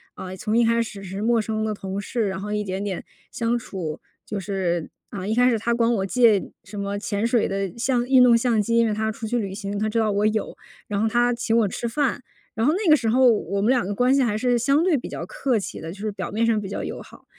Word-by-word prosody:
呃， 185 Hz, 0 st, -7 dB
从 215 Hz, +4 st, 0 dB
一 235 Hz, -, +5 dB
开 230 Hz, 0 st, +3 dB
始 200 Hz, -3 st, -6 dB
是 195 Hz, +2 st, -6 dB
陌 230 Hz, 0 st, +2 dB
生 215 Hz, 0 st, -2 dB
的 215 Hz, -, -1 dB
同 195 Hz, -1 st, -5 dB
事， 220 Hz, +1 st, -1 dB
然 190 Hz, 0 st, -4 dB
后 210 Hz, +1 st, -5 dB
一 210 Hz, -, -1 dB
点 190 Hz, 0 st, -4 dB
点 195 Hz, -3 st, -4 dB, 0.3 s
相 235 Hz, +1 st, 0 dB
处。 175 Hz, -9 st, -5 dB, 0.3 s
就 205 Hz, -2 st, -3 dB
是， 180 Hz, -4 st, -2 dB, 0.2 s
啊， 190 Hz, -2 st, -6 dB
一 215 Hz, -, 0 dB
开 245 Hz, +2 st, +4 dB
始 230 Hz, -, +2 dB
她 235 Hz, +2 st, 0 dB
管 235 Hz, 0 st, +2 dB
我 195 Hz, -3 st, 0 dB
借 225 Hz, -2 st, +3 dB
什 205 Hz, +2 st, -9 dB
么 200 Hz, 0 st, -3 dB
潜 205 Hz, 0 st, -2 dB
水 235 Hz, -1 st, +2 dB
的 195 Hz, -2 st, -2 dB
相 245 Hz, 0 st, +1 dB
运 260 Hz, 0 st, +5 dB
动 240 Hz, -2 st, +7 dB
相 230 Hz, -3 st, +2 dB
机， 230 Hz, +3 st, 0 dB
因 230 Hz, -, +5 dB
为 215 Hz, -, 0 dB
她 220 Hz, +1 st, -1 dB
出 220 Hz, +1 st, -6 dB
去 240 Hz, +3 st, -1 dB
旅 195 Hz, -3 st, -4 dB
行， 200 Hz, -1 st, -4 dB
她 215 Hz, -, 0 dB
知 215 Hz, -, -2 dB
道 215 Hz, -2 st, +2 dB
我 205 Hz, +1 st, +1 dB
有， 215 Hz, 0 st, 0 dB, 0.4 s
然 200 Hz, 0 st, -1 dB
后 225 Hz, -, +2 dB
她 240 Hz, +2 st, +2 dB
请 235 Hz, -1 st, -1 dB
我 225 Hz, -, +4 dB
吃 235 Hz, +4 st, -3 dB
饭。 270 Hz, +1 st, 0 dB, 0.3 s
然 225 Hz, +2 st, 0 dB
后 305 Hz, -, +4 dB
那 375 Hz, -1 st, 0 dB
个 305 Hz, -, +7 dB
时 235 Hz, -, -3 dB
候， 255 Hz, +3 st, +4 dB
我 200 Hz, -2 st, -1 dB
们 215 Hz, -, +2 dB
两 250 Hz, -7 st, +2 dB
个 205 Hz, -, -2 dB
关 250 Hz, +4 st, +3 dB
系 275 Hz, -, +3 dB
还 215 Hz, -4 st, +1 dB
是 245 Hz, +1 st, +2 dB
相 280 Hz, +6 st, +3 dB
对 360 Hz, -5 st, +3 dB
比 245 Hz, -, -6 dB
较 -, -, -6 dB
客 275 Hz, -, -1 dB
气 200 Hz, -, -5 dB
的， 160 Hz, +2 st, -6 dB
就 200 Hz, -, -14 dB
是 215 Hz, 0 st, -2 dB
表 195 Hz, -2 st, -5 dB
面 220 Hz, +3 st, 0 dB
上 225 Hz, -2 st, +2 dB
比 200 Hz, -, -5 dB
较 200 Hz, -, -4 dB
友 -, -, -5 dB
好。 -, -, -15 dB
220 Hz, 300 characters per minute, -23 LUFS, 200-240 Hz, 0.4 s, 动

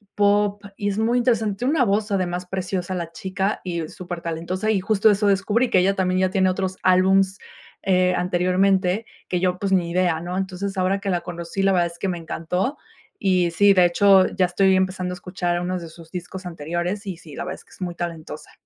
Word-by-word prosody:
pop, 205 Hz, 0 st, +2 dB, 0.2 s
y 205 Hz, -, -1 dB
es 200 Hz, -, -3 dB
muy 235 Hz, +2 st, +2 dB
interesante. 225 Hz, -3 st, 0 dB
Una 280 Hz, -1 st, +3 dB
voz 205 Hz, +1 st, 0 dB
además 180 Hz, -2 st, -1 dB
preciosa 185 Hz, 0 st, -3 dB
la 170 Hz, -2 st, -4 dB
chica 190 Hz, +4 st, -2 dB
y 170 Hz, -3 st, -3 dB
súper 175 Hz, 0 st, -7 dB
talentosa, 170 Hz, +5 st, -3 dB
y 210 Hz, -, +2 dB
justo 215 Hz, +1 st, +3 dB
eso 205 Hz, 0 st, +2 dB
descubrí 205 Hz, +5 st, +2 dB
que 185 Hz, -, +4 dB
ella 195 Hz, +2 st, +2 dB
también, 185 Hz, -1 st, +1 dB
ya 185 Hz, -, +2 dB
tiene 190 Hz, 0 st, +2 dB
otros 185 Hz, 0 st, -2 dB
álbumes, 190 Hz, +1 st, +3 dB, 0.5 s
eh, 185 Hz, -1 st, +3 dB
anteriormente 185 Hz, +3 st, +1 dB, 0.2 s
que 180 Hz, -, -1 dB
yo, 185 Hz, -1 st, +1 dB
pues, 195 Hz, -1 st, -2 dB
ni 175 Hz, -2 st, +2 dB
idea, 175 Hz, -2 st, +1 dB
¿no? 180 Hz, +2 st, -4 dB
Entonces, 195 Hz, +1 st, -3 dB
ahora 190 Hz, +2 st, +1 dB
que 200 Hz, -1 st, -4 dB
la 175 Hz, -2 st, 0 dB
conocí 175 Hz, +2 st, -4 dB
la 195 Hz, 0 st, +4 dB
verdad 175 Hz, -1 st, +3 dB
es 170 Hz, 0 st, -12 dB
que 195 Hz, -, -1 dB
me 180 Hz, -, -2 dB
encantó 180 Hz, -, -3 dB, 0.4 s
y 185 Hz, -3 st, +2 dB
sí 200 Hz, +4 st, +5 dB
de 180 Hz, -2 st, +5 dB
hecho 190 Hz, +2 st, +5 dB
ya 185 Hz, -, +1 dB
estoy 190 Hz, +2 st, +3 dB
empezando 185 Hz, -1 st, 0 dB
a -, -, -5 dB
escuchar 175 Hz, -1 st, -2 dB
unos 180 Hz, 0 st, -2 dB
de 165 Hz, -, -8 dB
sus 165 Hz, 0 st, -14 dB
discos 185 Hz, +1 st, -7 dB
anteriores, 175 Hz, +5 st, -3 dB
y 190 Hz, -4 st, -5 dB
sí 160 Hz, -4 st, -12 dB
la -, -, -4 dB
verdad -, -, -4 dB
es -, -, -17 dB
que -, -, -25 dB
es -, -, -17 dB
muy 175 Hz, -1 st, -3 dB
talentosa. 165 Hz, -3 st, -6 dB
185 Hz, 215 wpm, -23 LUFS, 175-195 Hz, 0.5 s, sí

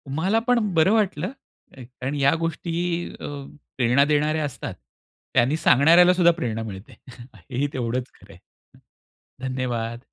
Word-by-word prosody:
मला 190 Hz, +8 st, +1 dB
पण 245 Hz, -1 st, +4 dB
बरं 165 Hz, +4 st, +4 dB
वाटलं, 200 Hz, -, 0 dB, 0.5 s
कारण 130 Hz, +2 st, -6 dB
या 140 Hz, 0 st, +3 dB
गोष्टी 165 Hz, 0 st, -3 dB, 0.5 s
अ, -, -, -7 dB, 0.5 s
प्रेरणा 125 Hz, +3 st, +3 dB
देणाऱ्या 150 Hz, +1 st, +1 dB
असतात. 140 Hz, -, -6 dB, 0.6 s
त्यांनी 135 Hz, +6 st, +3 dB
सांगणाऱ्याला 170 Hz, +7 st, +6 dB
सुद्धा 175 Hz, -1 st, +5 dB
प्रेरणा 115 Hz, -9 st, -3 dB
मिळते 100 Hz, -1 st, -9 dB, 0.2 s
हे 120 Hz, -2 st, -13 dB
ही 145 Hz, -, +1 dB
तेवढंच 125 Hz, 0 st, -3 dB
खरं 100 Hz, 0 st, -16 dB
आहे. 90 Hz, -, -17 dB, 1.1 s
धन्यवाद. 120 Hz, -3 st, -3 dB
140 Hz, 130 wpm, -23 LUFS, 120-165 Hz, 1.1 s, सांगणाऱ्याला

